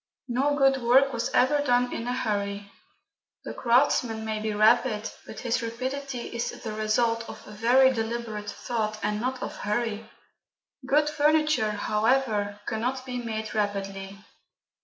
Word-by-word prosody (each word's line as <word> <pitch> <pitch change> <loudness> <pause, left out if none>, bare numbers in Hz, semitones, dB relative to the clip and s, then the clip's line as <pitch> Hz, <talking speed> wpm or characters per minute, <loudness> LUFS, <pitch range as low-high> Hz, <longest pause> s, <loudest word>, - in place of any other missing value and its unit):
No 275 +4 +1
good 270 -1 +3
work 265 +3 +4
was 235 - -1
ever 290 +4 +3
done 245 -3 +2
in 230 - -4
a 245 - 0
hurry: 200 -3 -2 0.7
the - - -6
craftsman 235 -2 +2
may 220 -1 -2
be 215 0 -1
rapid, 220 +1 +3 0.2
but - - -8
his 235 -2 0
rapidity 255 +3 -4
is 235 - -1
the 220 -2 -4
result 230 +2 0
of - - -10
very 245 +5 +4
deliberate 225 -2 -3
thought, 215 -3 -3
and 210 0 -1
not 255 +1 -2
of - - -6
hurry. 220 0 -2 0.8
Good 295 +2 +3
furniture, 300 -6 +2
however, 210 -1 0
cannot 250 +3 -2
be 250 -1 -4
made 220 -2 -4
rapidly. 195 -2 -3
230 Hz, 140 wpm, -27 LUFS, 215-260 Hz, 0.8 s, work